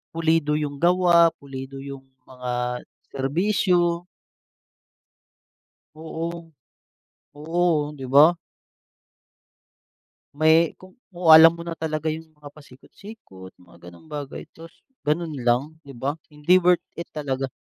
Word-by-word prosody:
pulido 160 Hz, -2 st, +1 dB
yung 145 Hz, -2 st, -3 dB
gawa, 175 Hz, 0 st, +4 dB
pulido 135 Hz, -1 st, -9 dB
yung 135 Hz, -1 st, -10 dB, 0.2 s
mga 125 Hz, -1 st, -4 dB, 0.3 s
serbisyo. 175 Hz, +4 st, 0 dB, 1.9 s
Oo. 165 Hz, +1 st, -6 dB, 0.8 s
Oo, 155 Hz, 0 st, -1 dB
di 135 Hz, -, -7 dB
ba? 155 Hz, +5 st, +7 dB, 2.0 s
May 160 Hz, +2 st, +3 dB
kung 185 Hz, 0 st, -16 dB, 0.2 s
kung 175 Hz, -1 st, -6 dB
alam 160 Hz, +1 st, +10 dB
mo 170 Hz, -, -8 dB
na 170 Hz, -, -4 dB
talaga 155 Hz, -1 st, -4 dB
yung 160 Hz, +1 st, -4 dB
mga 145 Hz, -1 st, -13 dB
pasikot-sikot, 140 Hz, -, -14 dB
mga 90 Hz, 0 st, -16 dB
ganong 85 Hz, -, -18 dB
bagay, 145 Hz, -3 st, -7 dB
tapos 165 Hz, 0 st, -14 dB, 0.2 s
ganun 155 Hz, +1 st, -1 dB
lang 120 Hz, -2 st, +1 dB, 0.2 s
di 140 Hz, -, -14 dB
ba? 135 Hz, +2 st, -3 dB, 0.2 s
Hindi 150 Hz, +4 st, +2 dB
worth 175 Hz, -1 st, +2 dB
it 170 Hz, -, -8 dB
talaga. 135 Hz, -3 st, -4 dB
155 Hz, 110 wpm, -23 LUFS, 135-170 Hz, 2.0 s, alam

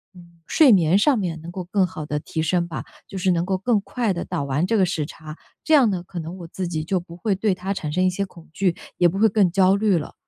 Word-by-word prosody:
嗯， 170 Hz, -1 st, -17 dB
睡 305 Hz, -6 st, +5 dB
眠 180 Hz, -3 st, +4 dB
上 270 Hz, +5 st, +3 dB
面 170 Hz, -5 st, -3 dB
能 165 Hz, +2 st, -8 dB
够 185 Hz, +1 st, -5 dB
更 190 Hz, +2 st, +2 dB
好 180 Hz, -4 st, -7 dB
地 150 Hz, 0 st, -2 dB
提 160 Hz, -, -4 dB
升 170 Hz, +2 st, 0 dB
吧， 165 Hz, -, -5 dB, 0.2 s
就 -, -, -11 dB
是 190 Hz, 0 st, 0 dB
能 170 Hz, 0 st, 0 dB
够 190 Hz, 0 st, 0 dB
更 220 Hz, +2 st, +2 dB
快 230 Hz, +1 st, -2 dB
地 170 Hz, -, -4 dB
倒 -, -, -3 dB
完 140 Hz, +4 st, 0 dB
这 225 Hz, -, 0 dB
个 190 Hz, -, +4 dB
时 165 Hz, -4 st, -2 dB
差。 155 Hz, 0 st, -10 dB, 0.3 s
这 315 Hz, -, +1 dB
样 270 Hz, -5 st, +6 dB
呢， 180 Hz, -3 st, -3 dB
可 180 Hz, 0 st, -10 dB
能 165 Hz, +2 st, -6 dB
我 170 Hz, -, -8 dB
自 180 Hz, +2 st, -4 dB
己 160 Hz, -2 st, -3 dB
就 185 Hz, +4 st, 0 dB
不 170 Hz, -1 st, -12 dB
会 200 Hz, +2 st, 0 dB
对 195 Hz, +1 st, +1 dB
它 190 Hz, +2 st, -3 dB
产 150 Hz, -5 st, -4 dB
生 185 Hz, +3 st, +1 dB
一 -, -, +4 dB
些 200 Hz, +2 st, -2 dB
恐 170 Hz, -3 st, -16 dB
惧， 180 Hz, -1 st, +1 dB, 0.2 s
也 175 Hz, -, +5 dB
不 185 Hz, -, -4 dB
会 220 Hz, -, +6 dB
更 195 Hz, -3 st, +3 dB
焦 190 Hz, +1 st, +4 dB
虑 200 Hz, -2 st, +2 dB
了。 150 Hz, -, -8 dB
180 Hz, 305 characters per minute, -22 LUFS, 170-195 Hz, 0.3 s, 样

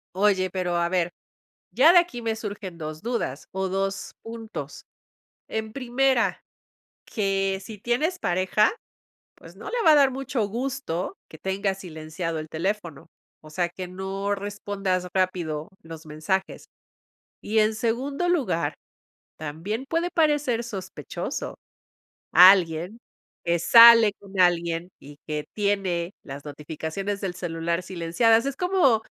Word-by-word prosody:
Oye, 190 Hz, -1 st, +2 dB
pero, 180 Hz, -1 st, -2 dB
a 170 Hz, 0 st, +1 dB
ver, 175 Hz, -1 st, 0 dB, 0.6 s
ya 330 Hz, -, +6 dB
de 355 Hz, -, +8 dB
aquí 345 Hz, -9 st, 0 dB
me 225 Hz, -1 st, -1 dB
surgen 205 Hz, -5 st, -6 dB
2 155 Hz, -1 st, -6 dB
dudas, 225 Hz, -, -3 dB
o, 190 Hz, 0 st, -1 dB
2 195 Hz, +1 st, -2 dB
puntos. 225 Hz, -1 st, -8 dB, 0.6 s
En 220 Hz, 0 st, -4 dB
primera, 260 Hz, 0 st, +1 dB, 0.6 s
que 195 Hz, -2 st, -1 dB
si 215 Hz, 0 st, -9 dB
tienes 275 Hz, -, 0 dB
pareja, 185 Hz, -, +2 dB, 0.6 s
pues, -, -, -15 dB
no -, -, -8 dB
le 485 Hz, -1 st, -1 dB
va 315 Hz, -, +8 dB
a -, -, +7 dB
dar 280 Hz, -2 st, +5 dB
mucho 255 Hz, -4 st, -2 dB
gusto 240 Hz, -, -3 dB
que 160 Hz, -, -13 dB
tengas 190 Hz, +1 st, -2 dB
silenciado 160 Hz, -1 st, -5 dB
el 155 Hz, 0 st, -6 dB
teléfono, 170 Hz, -2 st, -3 dB, 0.4 s
o 155 Hz, -, -13 dB
sea, 175 Hz, +3 st, 0 dB
que 180 Hz, +1 st, -7 dB
no 195 Hz, +2 st, -3 dB
respondas 200 Hz, -2 st, -3 dB
rápido 175 Hz, -5 st, -1 dB
los 165 Hz, -1 st, -10 dB
mensajes. 155 Hz, +6 st, -3 dB, 0.7 s
Y, 220 Hz, +2 st, -1 dB
en 215 Hz, +1 st, +2 dB
segundo 255 Hz, +9 st, -1 dB
lugar, 170 Hz, -, 0 dB, 0.6 s
también 165 Hz, -, -4 dB
puede 335 Hz, +3 st, 0 dB
parecer 295 Hz, -8 st, +2 dB
sospechoso 200 Hz, -6 st, -6 dB, 0.8 s
alguien 180 Hz, +2 st, +6 dB, 0.5 s
que 170 Hz, 0 st, +2 dB
sale 230 Hz, +3 st, +9 dB
con 200 Hz, -1 st, -10 dB
alguien 170 Hz, -1 st, +2 dB
y 145 Hz, +1 st, -13 dB
que 150 Hz, -1 st, -3 dB
tiene 195 Hz, -4 st, -1 dB
las 140 Hz, +1 st, -9 dB
notificaciones 160 Hz, +7 st, -5 dB
del 190 Hz, -3 st, -3 dB
celular 170 Hz, 0 st, -2 dB
silenciadas, 195 Hz, +8 st, +2 dB
es 275 Hz, -, -2 dB
como, 355 Hz, -, +3 dB
195 Hz, 130 wpm, -25 LUFS, 170-230 Hz, 0.8 s, sale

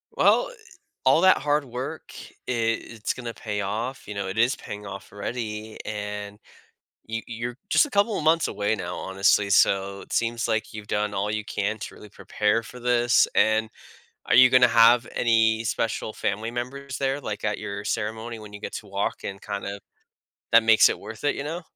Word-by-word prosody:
Well, -, -, +3 dB, 0.5 s
all 135 Hz, +6 st, +5 dB
that 185 Hz, 0 st, +6 dB
hard 145 Hz, +1 st, +1 dB
work, 125 Hz, +1 st, -5 dB, 0.4 s
i -, -, -1 dB
it's 115 Hz, -1 st, -1 dB
gonna 120 Hz, -2 st, -6 dB
pay 105 Hz, -3 st, -4 dB
off, 110 Hz, +7 st, -4 dB
you 105 Hz, -, -5 dB
know, 100 Hz, -1 st, -3 dB
it 95 Hz, +3 st, -5 dB
is 120 Hz, +4 st, +3 dB
paying 105 Hz, 0 st, -8 dB
off 100 Hz, 0 st, -9 dB
already, 110 Hz, 0 st, -5 dB
and 105 Hz, -1 st, -5 dB, 0.7 s
you 115 Hz, +1 st, -4 dB
you're 120 Hz, +1 st, -5 dB
just -, -, +5 dB
a -, -, -12 dB
couple 205 Hz, 0 st, +2 dB
of -, -, -3 dB
months 160 Hz, +1 st, +4 dB
away 105 Hz, +1 st, 0 dB
now, 90 Hz, -4 st, -5 dB
honestly 100 Hz, +1 st, +2 dB
so 100 Hz, 0 st, +3 dB
it -, -, -12 dB
seems 115 Hz, 0 st, 0 dB
like 110 Hz, -1 st, -1 dB
you've 105 Hz, -1 st, -8 dB
done 105 Hz, 0 st, -1 dB
all 100 Hz, +2 st, -1 dB
you 110 Hz, 0 st, -2 dB
can 105 Hz, +2 st, -2 dB
to -, -, -7 dB
really 105 Hz, -, -13 dB
prepare 105 Hz, +2 st, 0 dB
for 125 Hz, +2 st, -11 dB
this 120 Hz, 0 st, +3 dB
and 110 Hz, +1 st, +3 dB, 0.6 s
are -, -, +1 dB
you 130 Hz, +1 st, +8 dB
gonna 125 Hz, -1 st, +6 dB
have 120 Hz, +1 st, +5 dB
any 110 Hz, -1 st, +3 dB
special 110 Hz, -1 st, -2 dB
family 105 Hz, +3 st, -2 dB
members 130 Hz, +2 st, -5 dB
there, 135 Hz, +1 st, -1 dB
like, 105 Hz, -5 st, -5 dB
at 105 Hz, -1 st, -1 dB
your 100 Hz, -1 st, -5 dB
ceremony 110 Hz, +2 st, -3 dB
when 105 Hz, -1 st, -11 dB
you 105 Hz, -, -8 dB
get -, -, -6 dB
to 110 Hz, -, -7 dB
walk 100 Hz, +1 st, -3 dB
and 100 Hz, -1 st, -6 dB
kind 100 Hz, -1 st, -4 dB
of 100 Hz, 0 st, -5 dB, 0.7 s
that 115 Hz, 0 st, +7 dB
makes 110 Hz, -1 st, +7 dB
it -, -, -2 dB
worth 110 Hz, +3 st, -10 dB
it, 145 Hz, -, +2 dB
you -, -, -4 dB
know? 165 Hz, +4 st, -4 dB
110 Hz, 195 wpm, -25 LUFS, 105-120 Hz, 0.7 s, you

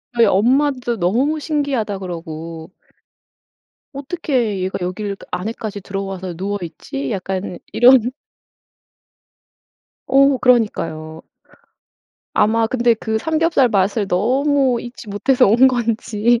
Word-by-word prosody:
저희 235 Hz, -1 st, +5 dB
엄마도 245 Hz, +4 st, +2 dB
너무 245 Hz, -, +1 dB
신기하다 275 Hz, -10 st, -2 dB
그러고. 165 Hz, -2 st, -7 dB, 1.2 s
어떻게 270 Hz, -, -2 dB
얘가 185 Hz, +1 st, -2 dB
여길 200 Hz, +3 st, -3 dB
그 -, -, -15 dB
안에까지 205 Hz, +2 st, -4 dB
들어와서 195 Hz, -2 st, -5 dB
누워 200 Hz, +4 st, -3 dB
있지? 145 Hz, -4 st, -6 dB
약간 185 Hz, -1 st, -4 dB
이런. 245 Hz, 0 st, +5 dB, 2.0 s
어 275 Hz, 0 st, +4 dB
그러니까요. 165 Hz, -10 st, 0 dB, 1.1 s
아마 225 Hz, +1 st, +2 dB
근데 240 Hz, 0 st, +2 dB
그 220 Hz, 0 st, -2 dB
삼겹살 320 Hz, -1 st, +2 dB
맛을 200 Hz, 0 st, 0 dB
너무 260 Hz, +6 st, +1 dB
잊지 240 Hz, -2 st, -10 dB
못해서 250 Hz, +6 st, +2 dB
온 240 Hz, +6 st, +6 dB
건지. 235 Hz, -1 st, 0 dB
220 Hz, 235 characters per minute, -19 LUFS, 190-255 Hz, 2.0 s, 온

